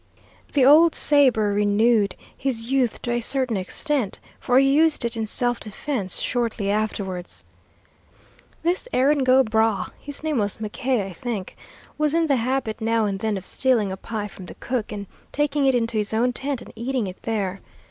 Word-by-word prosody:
The 275 -3 +4
old 315 +4 +7
sabre 250 -8 +4
renewed 205 0 +2 0.2
his 245 -3 -3
youth 260 -4 +1
to 240 - -2
a 240 - +1
certain 255 -1 0
extent, 225 +5 -2 0.2
for 250 -1 +2
he 270 +1 +5
used 310 -3 +3
it 235 - -2
in 220 -1 -2
self 245 +2 -1
defense 215 -2 -4
shortly 230 -4 -1
afterwards. 200 -4 -3 1.2
This 350 +8 0
Erin 275 +2 +3
go 260 +1 +5
bragh 220 -3 +1
his 285 +1 -9
name 310 -5 0
was 205 -1 -1
McKay, 220 +1 -1
I 190 - -8
think 210 0 -5 0.4
was 305 0 +2
in 335 0 +3
the 280 -4 +2
habit 245 -2 -2
now 225 0 +1
and 195 -2 -2
then 215 -1 -1
of 190 - -8
stealing 235 -7 +1
a - - -3
pie 210 +1 -5
from 190 -2 -11
the - - -10
cook, 245 -4 -3
and 205 -1 -5 0.3
taking 290 -1 +1
it 265 - +4
into 230 -2 0
his 210 +1 -1
own 245 +2 +2
tent 270 0 -3
and - - -14
eating 245 0 -2
it 185 -1 -8
there. 195 -4 -2
235 Hz, 180 wpm, -23 LUFS, 210-270 Hz, 1.2 s, old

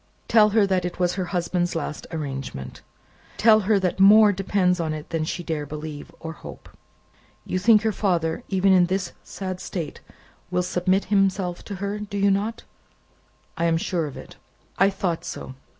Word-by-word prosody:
Tell 215 -2 +5
her 210 0 +4
that 190 -2 0
it 175 -1 -4
was 180 -1 +1
her 185 -1 -2
husband's 175 0 -1
last 150 -2 -4
arrangement. 135 - -6 0.6
Tell 220 -1 +6
her 210 0 +2
that 185 0 -1
more 210 +2 +8
depends 185 -1 +1
upon 160 -2 -1
it 155 +1 -9
than 160 -2 -1
she 175 +2 -4
dare 155 -3 -3
believe, 150 +1 -7
or 160 0 -6
hope. - - -11 0.8
You 185 - -1
think 215 +2 +5
that - - -8
her 220 - +3
father, 170 -6 0
even 190 0 +3
in 180 -2 +5
this 190 0 -2
sad 185 -2 -6
state, 165 -6 -5 0.5
will 180 0 0
submit 185 +2 +1
himself 190 -3 +1
to 200 - -6
her; 200 +2 -3
do 205 -1 -5
you 200 0 +3
not?" 210 +4 -1 0.9
"I 165 - -1
am 165 -1 +2
sure 165 -1 -1
of 140 - -9
it." - - -11 0.4
"I 195 +1 +5
thought 185 -4 -2
so. - - -7
180 Hz, 180 wpm, -24 LUFS, 165-200 Hz, 0.9 s, more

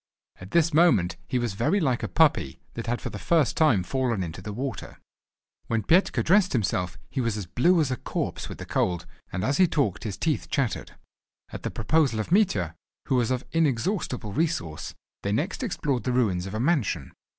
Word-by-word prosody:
At 90 - -11
this 165 +5 +3
moment 125 - +4
he 125 - 0
was 120 -4 -1
very 120 - +1
like 130 -8 +1
a - - -2
puppy, 150 - +2
that 115 - -6
had 120 +1 0
for - - -5
the - - -6
first 160 -7 +2
time 135 - +4
fallen 120 -3 -1
into 85 +1 -6
the 105 +3 -6
water. 130 +4 -5 0.7
When 115 -2 0
Petka 175 - +3
dressed 185 +1 +4
himself 90 -6 0
he 135 - -1
was 115 -3 -1
as 100 - -4
blue 165 - +3
as 145 -5 +1
a 130 - -1
corpse - - -4
with - - -7
the - - -7
cold, 90 -2 0 0.3
and 90 - -3
as 140 - +1
he 185 - +6
talked 140 - 0
his 105 -4 -4
teeth 155 -3 -1
chattered. 135 -5 -1 0.6
At - - -6
the - - -3
proposal 135 -1 +1
of 110 - -4
Mitya, 105 - +2 0.4
who 130 - +3
was 120 -2 +1
of 130 0 -1
inexhaustible 145 - 0
resource, 150 - -2 0.3
they - - -2
next - - -1
explored 130 -6 -1
the 125 - 0
ruins 95 -8 +1
of 95 - -6
a - - -2
mansion. 120 - 0
125 Hz, 200 wpm, -26 LUFS, 100-155 Hz, 0.7 s, he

